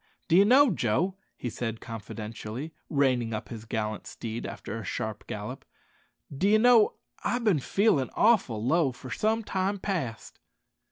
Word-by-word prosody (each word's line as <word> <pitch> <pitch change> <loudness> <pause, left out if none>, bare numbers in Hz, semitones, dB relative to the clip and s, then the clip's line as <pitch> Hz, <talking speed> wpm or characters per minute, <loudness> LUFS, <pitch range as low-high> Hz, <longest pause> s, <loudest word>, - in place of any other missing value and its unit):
"D'ye 175 +4 +7
know, 260 +4 +6
Joe," 155 - +1 0.2
he - - -4
said 115 -1 -4
confidentially, 115 +5 -7 0.2
reining 130 -6 +1
up 110 - -6
his 110 -2 -8
gallant 110 -1 -3
steed 115 0 -5
after 115 - -6
a - - -7
sharp 110 +2 -4
gallop 105 +5 -6 0.7
"d'ye 200 +9 +4
know 235 -1 +5 0.3
I've 245 0 0
bin 200 -9 +3
feelin' 150 - +2
awful 160 - +3
low 150 +1 +3
for 125 0 -10
some 220 - +1
time 195 0 -1
past." 165 - -4
130 Hz, 145 wpm, -28 LUFS, -, 0.7 s, D'ye